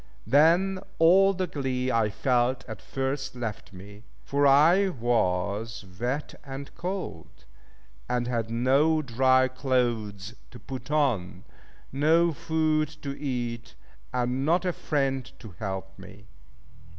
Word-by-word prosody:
Then 170 Hz, -, +4 dB, 0.2 s
all 190 Hz, +4 st, +6 dB
the 190 Hz, -1 st, -2 dB
glee 130 Hz, -5 st, -2 dB
I 115 Hz, -3 st, +2 dB
felt 125 Hz, +2 st, 0 dB
at 110 Hz, -4 st, -8 dB
first 135 Hz, 0 st, -3 dB
left 115 Hz, -4 st, -5 dB
me; 100 Hz, +2 st, -12 dB, 0.2 s
for 140 Hz, 0 st, +2 dB
I 165 Hz, +8 st, +5 dB
was 110 Hz, -, -1 dB
wet 130 Hz, +5 st, -2 dB
and 135 Hz, 0 st, -8 dB
cold, 180 Hz, -, -6 dB, 0.6 s
and 125 Hz, -1 st, 0 dB
had 115 Hz, -2 st, -2 dB
no 135 Hz, +7 st, +2 dB
dry 130 Hz, +1 st, +3 dB
clothes 120 Hz, -6 st, -1 dB, 0.2 s
to 125 Hz, -, -12 dB
put 130 Hz, +2 st, -8 dB
on, 115 Hz, -12 st, 0 dB, 0.5 s
no 160 Hz, +5 st, +3 dB
food 155 Hz, 0 st, 0 dB, 0.2 s
to 140 Hz, -1 st, -4 dB
eat 120 Hz, -4 st, -4 dB, 0.4 s
and 125 Hz, +1 st, -1 dB
not 170 Hz, +5 st, +2 dB
a 180 Hz, -, 0 dB
friend 135 Hz, -5 st, -1 dB
to 110 Hz, -, -11 dB
help 95 Hz, -2 st, -5 dB
me. 100 Hz, +1 st, -13 dB
130 Hz, 125 wpm, -27 LUFS, 115-150 Hz, 0.6 s, all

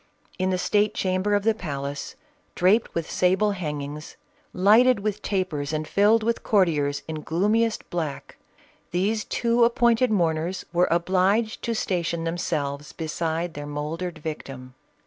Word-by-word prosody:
In 185 Hz, 0 st, +1 dB
the 185 Hz, -, +1 dB
state 210 Hz, +3 st, +1 dB
chamber 185 Hz, +2 st, +1 dB
of 205 Hz, -, 0 dB
the 225 Hz, +1 st, +3 dB
palace, 140 Hz, -8 st, -5 dB, 0.4 s
draped 200 Hz, +6 st, +2 dB
with 165 Hz, -1 st, -2 dB
sable 190 Hz, +3 st, +2 dB
hangings, 150 Hz, -4 st, -5 dB, 0.3 s
lighted 215 Hz, +5 st, +5 dB
with 210 Hz, 0 st, -2 dB
tapers 175 Hz, -8 st, -2 dB
and 155 Hz, 0 st, -2 dB
filled 215 Hz, +3 st, +3 dB
with 230 Hz, +1 st, 0 dB
courtiers 150 Hz, -8 st, +1 dB
in 155 Hz, -1 st, -5 dB
gloomiest 210 Hz, +8 st, 0 dB
black, 160 Hz, -5 st, -4 dB, 0.5 s
these 205 Hz, +5 st, 0 dB
two 235 Hz, 0 st, +1 dB
appointed 235 Hz, +1 st, +3 dB
mourners 170 Hz, -2 st, 0 dB
were 175 Hz, +1 st, +3 dB
obliged 190 Hz, +6 st, +1 dB
to 230 Hz, -, -2 dB
station 170 Hz, -5 st, -1 dB
themselves 150 Hz, -4 st, -3 dB
beside 165 Hz, +1 st, -3 dB
their 145 Hz, 0 st, -7 dB
mouldered 160 Hz, +4 st, -4 dB
victim. 135 Hz, -5 st, -7 dB
180 Hz, 135 wpm, -25 LUFS, 155-210 Hz, 0.5 s, lighted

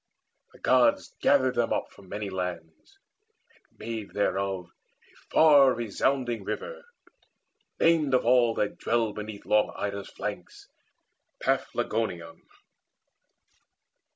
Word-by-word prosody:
The -, -, -18 dB
Gods -, -, +2 dB
Gathered 130 Hz, -3 st, +3 dB
them 120 Hz, -2 st, 0 dB
up -, -, -2 dB
from 95 Hz, -2 st, -17 dB
many 105 Hz, 0 st, -5 dB
lands, 90 Hz, -, -6 dB, 0.6 s
and -, -, -33 dB
made 115 Hz, -3 st, -6 dB
Thereof 95 Hz, -2 st, -1 dB
a 85 Hz, -, -32 dB
far 145 Hz, -5 st, +6 dB
resounding 120 Hz, +2 st, -1 dB
river, -, -, -6 dB, 0.9 s
named 155 Hz, -5 st, +3 dB
Of 125 Hz, -, +1 dB
all 120 Hz, -2 st, +4 dB
that 105 Hz, -, -2 dB
dwell 115 Hz, -2 st, 0 dB
beneath 105 Hz, -1 st, -8 dB
long 105 Hz, 0 st, +2 dB
Ida's 100 Hz, -1 st, -4 dB
flanks -, -, -7 dB, 0.8 s
Paphlagoneion. 90 Hz, -7 st, -2 dB
110 Hz, 105 wpm, -27 LUFS, 100-130 Hz, 0.9 s, far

